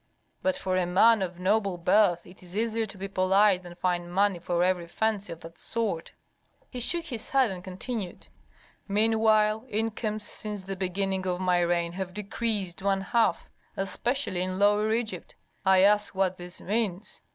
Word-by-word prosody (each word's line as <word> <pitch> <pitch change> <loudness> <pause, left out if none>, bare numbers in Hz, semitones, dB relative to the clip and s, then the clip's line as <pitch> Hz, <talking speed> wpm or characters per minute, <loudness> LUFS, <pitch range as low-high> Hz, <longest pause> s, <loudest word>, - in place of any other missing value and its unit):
But 185 0 +1
for 185 -1 -1
a 180 -1 +1
man 215 +5 +5
of 180 -2 -4
noble 195 0 +1
birth 175 0 +3
it 180 - -15
is 180 +2 -9
easier 225 0 0
to 195 - -8
be 195 +1 -5
polite 195 0 +3
than 175 -1 -11
find 175 -1 -1
money 195 0 +2
for 175 0 0
every 180 -2 0
fancy 210 +1 -1
of 165 - -8
that 165 0 -12
sort." 220 -8 -2 0.6
He 250 - -5
shook 335 +7 +1
his 235 -8 -2
head 265 -5 +3
and 180 -1 -7
continued, 190 +1 -6 0.6
"Meanwhile 215 +1 +3
incomes 215 0 -2
since 210 -1 -4
the 195 +1 -5
beginning 190 0 -2
of 180 0 -1
my 180 -1 +2
reign 170 -1 +1
have 185 0 -6
decreased 205 -3 -1
one 195 0 +1
half, 225 +4 0 0.3
especially 195 +1 -1
in 185 0 -2
Lower 205 +2 +3
Egypt. 220 -6 -3 0.3
I 190 -1 +6
ask 205 +1 +3
what 190 -1 +1
this 175 0 -8
means. 205 -2 -3
195 Hz, 170 wpm, -27 LUFS, 180-215 Hz, 0.6 s, I